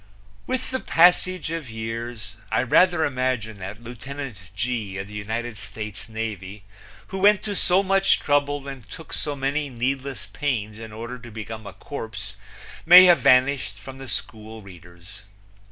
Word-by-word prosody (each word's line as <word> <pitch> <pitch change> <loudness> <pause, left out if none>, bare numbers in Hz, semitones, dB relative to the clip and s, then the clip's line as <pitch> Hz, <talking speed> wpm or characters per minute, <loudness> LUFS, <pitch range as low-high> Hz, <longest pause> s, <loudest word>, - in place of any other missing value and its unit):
With 255 0 -2
the 260 - -1
passage 180 -1 +3
of 165 -6 -4
years 115 0 -6 0.2
I - - +2
rather 175 +5 +4
imagine 125 -5 -2
that 100 +4 -7
Lieutenant 125 0 -7 0.2
G, 105 -3 -2
of 100 0 -5
the 105 - -12
United 110 +2 -4
States 105 +1 -8
Navy, 105 -3 -5 0.5
who 190 - -4
went 205 +1 +5
to 205 -2 -2
so 185 +1 +4
much 195 0 +3
trouble 145 -1 +1
and 135 -5 -9
took 160 - -9
so 145 -1 -2
many 140 +2 -1
needless 130 +2 -3
pains 110 -7 -2
in 110 -1 -8
order 115 +3 -7
to 120 0 -11
become 110 -1 -7
a 100 - -8
corpse 105 -6 -6 0.5
may 180 +3 +10
have 175 -2 +6
vanished 135 0 +3
from 135 0 -10
the 135 -2 -8
school 110 0 -6
readers. 90 +1 -13
120 Hz, 155 wpm, -24 LUFS, 110-145 Hz, 0.5 s, may